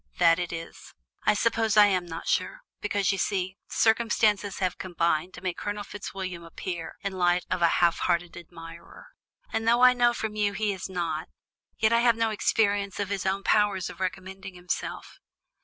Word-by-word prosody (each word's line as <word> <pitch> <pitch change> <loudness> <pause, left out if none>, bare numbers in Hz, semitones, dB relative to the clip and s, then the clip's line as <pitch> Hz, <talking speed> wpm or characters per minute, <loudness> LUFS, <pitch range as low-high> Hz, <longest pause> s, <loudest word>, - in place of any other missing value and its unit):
"That 170 -1 +5
it 175 -1 -3
is; 165 0 -9 0.3
I 210 - +4
suppose 225 -1 +1
I 210 - +9
am 185 -3 +1
not 165 0 -7
sure; - - 0 0.2
because, 205 -2 0
you 195 - -2
see, 190 0 -1
circumstances 215 -3 +2
have 185 -2 -1
combined 170 -1 -1
to - - -10
make 180 -2 -3
Colonel 205 0 -3
Fitzwilliam 190 -4 -6
appear 170 0 -6
in 200 -1 -3
light 180 -1 +1
of 180 - 0
a 170 - +6
half 170 0 +2
hearted 175 0 0
admirer, 170 - -12 0.4
and 225 - -1
though 240 +2 +4
I 250 0 +8
know 240 -1 +3
from 220 -2 -3
you 205 -1 +1
he 210 0 0
is 190 0 -6
not, 170 -4 -3 0.5
yet 220 +1 +3
I 235 - +5
have 235 -1 +4
no 225 -1 +1
experience 205 -2 +1
of 200 -1 -2
his 195 -1 -2
own 195 +1 -1
powers 205 -4 +2
of 170 - -14
recommending 190 0 -5
himself. 180 0 -5
190 Hz, 185 wpm, -27 LUFS, 175-210 Hz, 0.5 s, I